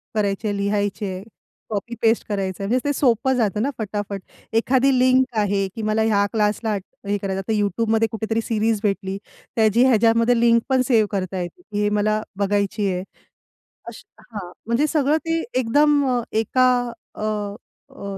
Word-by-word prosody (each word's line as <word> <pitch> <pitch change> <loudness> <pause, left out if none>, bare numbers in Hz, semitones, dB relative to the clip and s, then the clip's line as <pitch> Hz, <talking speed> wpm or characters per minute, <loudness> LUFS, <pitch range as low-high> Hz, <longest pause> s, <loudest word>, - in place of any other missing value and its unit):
करायचे 205 0 0
आहे, 205 - -1
लिहायचे 205 +1 -1
आहे, 185 +1 -7 0.5
कॉपी 220 +2 -4
पेस्ट 225 0 +2
करायचंय. 195 -2 -2
म्हणजे 245 +5 +2
ते - - +2
सोपं 260 -1 +2
जातं 210 -3 0
ना 270 - +1
फटाफट. 205 -1 -3 0.4
एखादी 260 +3 +3
लिंक 255 +1 +4
आहे 200 -1 +1
की 225 - -5
मला 215 +1 +1
ह्या 210 -2 +3
क्लासला 215 0 0 0.3
हे 205 0 +1
करायचं 195 -1 -3
आता 195 +3 -4
YouTubeमध्ये 220 +2 +1
कुठेतरी 225 0 -1
सीरीज 225 -1 0
भेटली. 195 -1 -1 0.4
त्याची 225 +2 +4
ह्याच्यामध्ये 230 0 +4
लिंक 235 0 +4
पण 260 -1 +3
सेव्ह 225 -5 +3
करता 190 -1 -2
येते, 175 - -7 0.2
हे 205 0 +2
मला 215 +1 +1 0.2
बघायची 200 +1 0
आहे. 180 0 -3 0.8
अशी - - -9 0.2
हां, 200 -6 -9 0.2
म्हणजे 240 +6 +2
सगळं 300 0 +2
ते 330 0 0 0.2
एकदम 290 +4 +3 0.3
एका 255 +4 +2 0.5
अ, - - -8 0.7
अ, 200 -1 -7
215 Hz, 155 wpm, -22 LUFS, 200-235 Hz, 0.8 s, लिंक